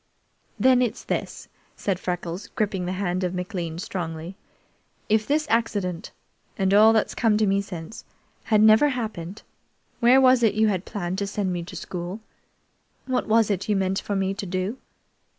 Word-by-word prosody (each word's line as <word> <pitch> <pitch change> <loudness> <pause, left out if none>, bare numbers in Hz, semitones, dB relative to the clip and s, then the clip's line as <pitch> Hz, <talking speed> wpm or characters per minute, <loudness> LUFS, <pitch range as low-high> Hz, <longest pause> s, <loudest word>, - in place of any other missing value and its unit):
"Then 255 -1 +5
it's 245 -3 -1
this," - - -4 0.3
said 195 -3 -2
Freckles, 175 0 -4
gripping 200 -6 -1
the 180 - -2
hand 185 -1 -2
of 180 0 -2
McLean 180 -3 -4
strongly. 170 -2 -5 0.7
"If 215 0 +2
this 305 +2 +1
accident, 205 -6 -1 0.5
and 195 -1 +1
all 215 +2 +7
that's 220 -1 +1
come 220 -3 +2
to 215 - +2
me 195 0 +2
since, 180 0 -8 0.4
had 215 -2 +3
never 220 +7 +6
happened, 215 -8 -5 0.6
where 245 +2 +6
was 255 -1 +5
it 220 -3 +3
you 215 0 +3
had 190 -2 -2
planned 185 -1 -4
to 200 - -2
send 195 -2 -2
me 175 - -3
to - - -10
school? 180 +3 -5 0.9
What 260 -1 -1
was 220 -1 +3
it 195 +1 -2
you 210 - +3
meant 190 0 0
for 205 - -3
me 195 0 0
to 200 - -6
do?" 185 +7 -3
200 Hz, 170 wpm, -24 LUFS, 180-220 Hz, 0.9 s, all